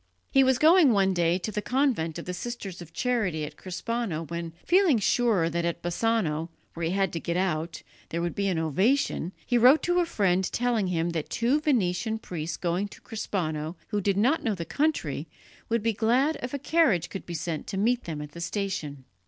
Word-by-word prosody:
He 270 - +5
was 260 -1 +3
going 315 -1 +6
one 195 -2 +3
day 175 0 +2
to 190 +4 -4
the 210 - -2
convent 245 - 0
of 170 - -7
the 180 - -4
Sisters 195 -3 -6
of 165 -2 -11
Charity 205 -12 0
at - - -9
Crespano 190 -2 -3
when, 170 +1 -5
feeling 360 -7 +4
sure 215 -5 +2
that 170 +1 -1
at 170 0 -2
Bassano, 175 -4 0 0.2
where 165 -1 -2
he - - -1
had 195 -1 0
to 165 - -2
get 170 +2 -2
out, 165 -3 -2 0.3
there 170 - -2
would 170 0 -1
be 200 0 -1
an 185 -3 0
ovation, 185 - +1
he 245 - +2
wrote 255 +6 +6
to 355 0 +2
a 350 - +3
friend 190 - +1
telling 235 -5 +1
him 170 -1 0
that 160 -3 -3
two 245 +6 +1
Venetian 220 -6 +1
priests 165 -6 -5
going 180 +3 -1
to - - -15
Crespano 165 -7 -3
who 210 -2 -1
did 195 0 +1
not 255 +10 +3
know 220 -4 0
the 170 -2 -5
country 175 - -1 0.4
would 230 -2 0
be 230 0 +1
glad 250 +9 +2
if 250 - -4
a - - -1
carriage 265 - +2
could 195 - -7
be 170 - -5
sent 160 -1 -4
to 195 - -4
meet 240 +5 +1
them 155 -3 -4
at 150 - -10
the 170 - -9
station. 170 -7 -3
190 Hz, 210 wpm, -27 LUFS, 170-240 Hz, 0.4 s, going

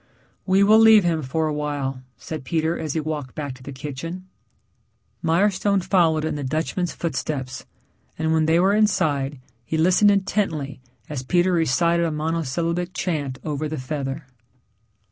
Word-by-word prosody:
"We 190 +1 +4
will 215 +2 +6
leave 220 -2 +7
him 165 -2 +1
for 155 +4 -1
awhile," 145 -3 -3 0.2
said 155 -4 -7
Peter 160 +4 0
as 155 -4 -3
he 160 - 0
walked 150 -4 -4
back 145 -3 -4
to 130 - -15
the 140 - -8
kitchen. 150 +7 -6 1.0
Mirestone 195 +4 +2
followed 165 -4 +2
in - - -1
the 145 - -4
Dutchman's 160 +5 -2
footsteps, 135 -5 -4 0.5
and 160 0 0
when 160 -1 +2
they 165 +1 +4
were 190 +3 +3
inside, 145 -10 +1 0.2
he 160 - -2
listened 185 +5 +5
intently 190 -9 -1 0.3
as 145 -4 -4
Peter 175 +7 +2
recited 170 +1 +2
a - - -2
monosyllabic 165 +3 -2
chant 145 -7 -2
over 155 0 -2
the 155 - -4
feather. 135 +1 -4
160 Hz, 150 wpm, -23 LUFS, 145-175 Hz, 1.0 s, leave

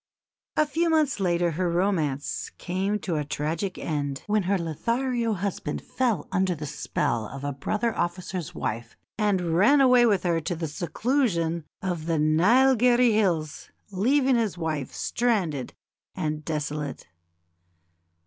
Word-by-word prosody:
A 305 - +5
few 330 +3 0
months 305 -7 +2
later 175 -2 +1
her 175 +3 -1
romance 170 -6 -1
came 190 +4 -1
to 170 -4 -2
a 150 - 0
tragic 155 +6 -3
end, 145 -3 -3
when 210 0 +2
her 200 - +3
Lothario 230 - -1
husband 185 -6 -3
fell 235 - -1
under 185 -1 +1
the 150 -1 -6
spell 140 -5 -2
of 140 +4 -8
a 145 - -1
brother 215 - -1
officer's 175 -2 -3
wife 115 +2 -4 0.2
and 185 -6 +1
ran 235 +11 +5
away 250 -3 +6
with 200 -5 +2
her 170 -2 +1
to 175 +3 -2
the 165 0 -3
seclusion 170 - 0 0.2
of 175 -4 -3
the 165 -1 +1
Neilgherry 240 - +4
Hills, 170 -8 0 0.2
leaving 260 +6 +3
his 220 -6 -1
wife 155 -5 -3
stranded 185 - -1 0.4
and 155 0 -2
desolate. 150 -2 -4
180 Hz, 140 wpm, -26 LUFS, 155-225 Hz, 0.4 s, away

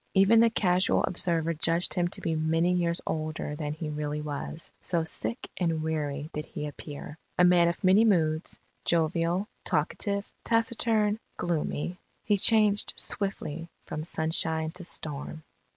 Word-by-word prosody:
Even 195 +4 +6
the 230 0 +6
casual 185 -4 +2
observer 165 -2 +1
judged 165 +2 +1
him 175 -1 +1
to - - -6
be 165 - -1
many 165 +3 +2
years 170 -1 +1
older 155 -1 -3
than 150 -1 -3
he 155 +1 -5
really 150 0 -3
was, 150 +2 -5
so 170 -2 0
sick 230 +8 -3
and 165 -3 0
weary 150 -2 -2
did 150 0 -4
he 150 - -5
appear.... 150 +1 -8 0.2
A 180 - +5
man 175 -1 +6
of 170 +3 -2
many 190 +4 +6
moods, 160 -7 +2 0.3
jovial, 170 +3 +1 0.2
talkative, 200 -1 0 0.2
taciturn, 225 -2 +2 0.2
gloomy, 170 +1 -2 0.2
he 210 - +3
changed 210 0 +4
swiftly 170 -6 -3 0.2
from 155 - -4
sunshine 160 0 0
to 180 +2 -8
storm. 155 -2 -5
170 Hz, 145 wpm, -28 LUFS, 155-185 Hz, 0.3 s, Even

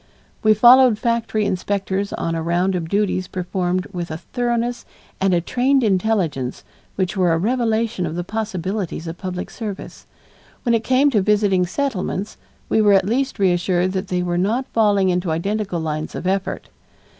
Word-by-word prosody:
We 215 0 +4
followed 245 +1 +7
factory 230 -2 0
inspectors 195 0 -2
on 165 - -2
a 165 - -2
round 175 +3 +1
of 170 -3 -3
duties 200 -2 0
performed 180 0 -2
with 175 -1 -4
a 155 - -4
thoroughness 240 +3 -2 0.4
and 195 0 +3
a 175 -1 +2
trained 260 +8 +1
intelligence 185 - 0 0.3
which 190 +1 -1
were 180 -3 +2
a - - +2
revelation 225 -1 0
of 160 - -5
the 175 - -2
possibilities 195 -4 -3
of 165 +1 -7
public 180 -1 -5
service. 210 -4 -7 0.6
When 235 - +2
it 230 -1 +1
came 265 +4 +3
to 215 -5 +3
visiting 200 -3 +2
Settlements, 205 -4 -3 0.3
we 220 - +2
were 205 -1 +5
at 195 -1 +4
least 260 +6 -1
reassured 180 -1 +1
that 190 +1 -3
they 180 -1 -1
were 175 0 -1
not 225 +8 0
falling 205 -4 +3
into 180 -1 0
identical 195 +3 -1
lines 155 -1 -4
of - - -5
effort. 190 +1 -2
195 Hz, 165 wpm, -21 LUFS, 180-220 Hz, 0.6 s, followed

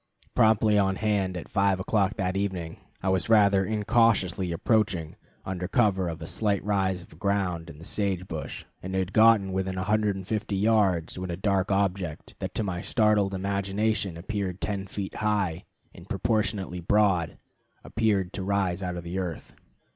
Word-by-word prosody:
Promptly 110 -1 +4
on 95 -1 +2
hand 100 -3 0
at 85 - -7
five 100 -2 +2
o'clock 100 +1 +1
that 95 -2 -1
evening, 95 -5 -3 0.3
I 95 - +1
was 95 +1 0
rather 100 -3 +5
incautiously 105 -4 +2
approaching 90 -3 0 0.3
under 90 -1 -3
cover 95 -4 +2
of 80 -1 -6
a - - -5
slight 100 +3 0
rise 95 -3 0
of 80 - -17
ground 90 -4 -1
and 75 - -11
the 80 - -10
sage 95 -3 -1
brush, 80 -4 -6 0.2
and 95 +1 -5
had 95 0 -1
gotten 110 -4 +5
within 95 0 -1
150 105 +1 -1
yards, 95 -5 +2
when 90 0 -4
a 85 - -3
dark 95 0 +1
object 95 -5 -1
that - - -5
to - - 0
my 90 -3 -3
startled 105 -2 +2
imagination 100 0 -1
appeared 95 0 -3
ten 100 -2 -3
feet 95 0 -5
high, 100 -6 0 0.3
and - - -14
proportionately 100 -5 -1
broad, 95 -2 +2 0.5
appeared 100 -5 0
to - - -4
rise 95 -2 0
out 90 -1 -3
of 85 - -6
the 85 +3 -4
earth. 90 -4 -5
95 Hz, 160 wpm, -27 LUFS, 90-105 Hz, 0.5 s, rather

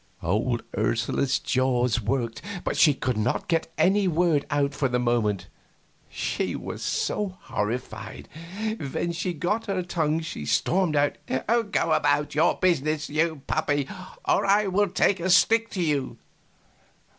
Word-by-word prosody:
Old 110 +7 0
Ursula's 115 +5 +1
jaws 125 -3 +1
worked, 115 +1 -2 0.2
but - - -1
she 150 -4 +5
could 125 -4 -2
not 110 +4 -1
get 165 -1 0
any 195 +1 +3
word 165 -4 +2
out 145 -1 +1
for 135 -2 0
the 125 - +1
moment, 120 -5 0 0.6
she - - -2
was - - -6
so 200 -3 -1
horrified. 125 0 -4 0.7
When 170 - -1
she 180 +2 -2
got 180 +8 -2
her 190 -2 -1
tongue 160 -2 0
she 160 - -6
stormed 160 - +1
out, 145 0 +2
"Go 205 - 0
about 145 -1 +2
your 160 +4 +3
business, 155 -4 0
you 155 -2 0
puppy, 145 -3 0 0.4
or - - +3
I 205 +2 +3
will 200 +1 +1
take 190 +2 +2
a 180 +2 -1
stick 225 +5 +4
to 185 - -3
you!" 145 -5 -1
150 Hz, 145 wpm, -25 LUFS, 125-180 Hz, 0.7 s, she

